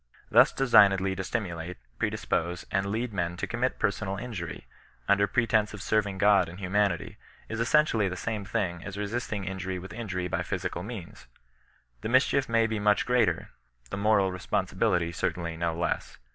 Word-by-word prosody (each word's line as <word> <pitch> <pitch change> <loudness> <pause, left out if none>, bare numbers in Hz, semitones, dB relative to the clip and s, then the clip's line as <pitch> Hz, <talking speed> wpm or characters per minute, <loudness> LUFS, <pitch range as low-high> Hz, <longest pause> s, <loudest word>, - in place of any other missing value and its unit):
Thus - - +7
designedly 100 -7 +5
to 95 - -3
stimulate, 90 -5 -4 0.2
predispose 85 +2 -1
and 95 0 +1
lead 110 +3 -2
men 85 -2 -2
to - - -2
commit 125 +2 -1
personal 100 -2 -1
injury, 100 -8 -6 0.4
under 100 0 +4
pretence 110 -3 +1
of 100 - -9
serving 105 -3 +1
God 100 -2 +4
and 85 - -10
humanity, 100 -2 0 0.3
is 115 - -4
essentially 115 -5 +3
the 90 - -4
same 110 0 -3
thing 95 -4 -1
as 100 - -7
directly 105 - -4
resisting 105 -1 -3
injury 95 0 -4
with 90 0 -8
injury 95 -6 -3
by - - -1
physical 85 - -3
means. 100 -3 -8 0.7
The - - -3
mischief 130 +1 +3
may 115 0 +3
be 110 -1 -1
much 105 0 +3
greater, 120 -9 +1 0.4
the - - -3
moral 100 -2 +3
responsibility 90 -1 0
certainly 85 0 -2
no 85 0 -1
less. 85 -1 -2
100 Hz, 165 wpm, -28 LUFS, 90-110 Hz, 0.7 s, Thus